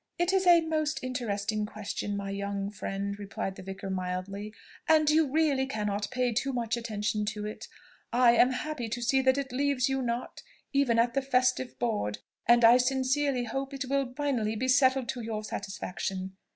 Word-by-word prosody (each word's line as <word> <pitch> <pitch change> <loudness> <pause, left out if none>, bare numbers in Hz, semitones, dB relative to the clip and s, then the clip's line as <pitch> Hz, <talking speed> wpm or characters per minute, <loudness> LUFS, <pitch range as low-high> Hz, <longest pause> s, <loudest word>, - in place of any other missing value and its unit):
"It 350 +2 +1
is 380 -1 +2
a 345 -1 +8
most 310 -2 -1
interesting 215 -4 -2
question, 205 -1 -4
my 200 0 -4
young 200 0 -3
friend," 200 0 -4
replied 195 -1 -4
the - - -9
vicar 190 +1 -6
mildly; 185 +3 -4 0.4
"and 310 -1 +5
you 310 0 +4
really 285 -4 +2
cannot 210 -4 -2
pay 250 -1 0
too 265 +5 0
much 230 -2 -1
attention 215 -2 -2
to 210 0 -3
it. 210 - -7 0.4
I 245 0 +5
am 240 +2 +5
happy 260 -2 -3
to 240 +2 -3
see 265 +2 +3
that 260 0 +3
it 275 -2 -3
leaves 275 0 +1
you 270 0 0
not, 240 0 -3 0.3
even 275 -4 +3
at 235 +1 +3
the 275 - +1
festive 255 -1 +1
board; 210 - -1 0.3
and 240 0 +6
I 235 +2 +8
sincerely 265 +1 +1
hope 270 +4 -4
it 275 0 -3
will 275 -2 +1
finally 250 -7 0
be 255 +4 -1
settled 260 0 +4
to 245 - -3
your 220 -1 -4
satisfaction. 190 -2 -4
240 Hz, 180 wpm, -29 LUFS, 210-270 Hz, 0.4 s, a